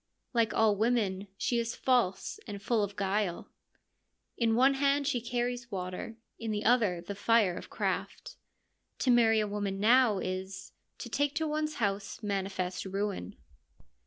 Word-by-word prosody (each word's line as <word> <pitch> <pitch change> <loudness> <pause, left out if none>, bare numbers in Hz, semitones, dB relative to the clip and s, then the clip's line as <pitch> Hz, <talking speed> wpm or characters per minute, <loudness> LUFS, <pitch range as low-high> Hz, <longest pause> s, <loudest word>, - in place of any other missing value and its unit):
Like 230 -3 +2
all 220 -2 +3
women, 205 -3 0
she 240 +3 0
is 235 0 -2
false 245 -8 +1
and 205 -1 -6
full 220 +2 +1
of 200 0 -4
guile: 195 -2 -1 0.4
' - - -49 0.3
In 225 -2 +2
one 265 +3 +5
hand 280 +1 +2
she 255 -4 0
carries 245 0 -2
water, 185 +3 -5 0.2
in 225 - -4
the 210 0 -2
other 215 -8 +3
the 190 +4 -6
fire 205 -2 +3
of - - -8
craft.' - - -3 0.6
To 255 - +2
marry 225 -2 +5
a 210 - 0
woman 200 -1 -3
now 230 0 +5
is, 190 +1 -5
' - - -50
To 235 - -6
take 285 +4 0
to 320 - 0
one's 305 0 -1
house 200 +1 -2
manifest 190 -2 -2
ruin.' 195 - -3
215 Hz, 160 wpm, -30 LUFS, 195-240 Hz, 0.6 s, one